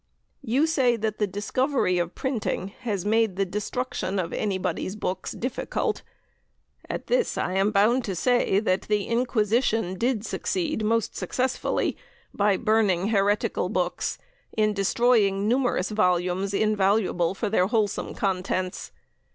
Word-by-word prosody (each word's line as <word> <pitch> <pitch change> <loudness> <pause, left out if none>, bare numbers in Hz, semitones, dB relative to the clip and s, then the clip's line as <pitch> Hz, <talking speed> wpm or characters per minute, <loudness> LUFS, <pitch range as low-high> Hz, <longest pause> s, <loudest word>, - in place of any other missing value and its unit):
You 270 +3 +2
say 265 -7 +2
that 220 -1 -3
the 210 - +2
discovery 205 0 0
of 175 0 -2
printing 235 -7 -2
has 205 -6 -3
made 220 -2 +2
the 195 +1 +1
destruction 200 0 -3
of 170 -3 -2
anybody's 190 -1 -2
books 190 -3 -3
difficult. 270 - -2 0.9
At - - -4
this - - +1
I 180 - -1
am 195 +2 +2
bound 215 +5 +3
to 195 - -3
say 245 -1 +2
that 185 -3 +1
the 210 -1 +2
Inquisition 230 -3 +1
did 230 +2 -1
succeed 310 - -2
most 225 0 0
successfully, 255 +7 -1 0.4
by 200 -1 +2
burning 210 -4 +2
heretical 205 -1 +1
books, - - -1 0.4
in 215 -1 +3
destroying 205 -1 +2
numerous 245 -5 +1
volumes 185 -1 +1
invaluable 195 -4 +2
for 215 - -2
their 185 -4 +3
wholesome 215 -2 -1
contents. 185 -1 -2
210 Hz, 130 wpm, -25 LUFS, 190-235 Hz, 0.9 s, bound